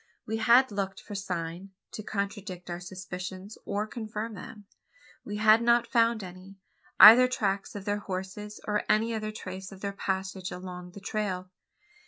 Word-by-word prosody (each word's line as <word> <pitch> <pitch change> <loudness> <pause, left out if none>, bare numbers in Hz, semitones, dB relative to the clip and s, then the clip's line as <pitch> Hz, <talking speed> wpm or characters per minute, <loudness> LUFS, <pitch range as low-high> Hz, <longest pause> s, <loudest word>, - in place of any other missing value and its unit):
We 220 +1 -2
had 235 +3 +5
looked 195 -1 -3
for 215 - -10
"sign" 180 -1 -4 0.2
to - - -6
contradict 200 -3 -4
our 175 - -4
suspicions, 185 +2 -7
or 205 +1 -1
confirm 220 0 -5
them. 205 +1 -10 0.6
We 210 0 -5
had 215 +1 +6
not 235 0 +4
found 230 -3 +2
any 185 +2 -11 0.4
either 240 +4 +11
tracks 200 -6 -2
of 200 -1 -6
their 205 0 0
horses, 195 +2 -6
or 210 0 0
any 225 +2 +3
other 215 -1 -3
trace 190 -2 -7
of 195 -1 -12
their 200 -1 -3
passage 190 -1 -3
along 180 0 -8
the 200 - -10
trail. 185 -4 -3
200 Hz, 160 wpm, -29 LUFS, 185-215 Hz, 0.6 s, either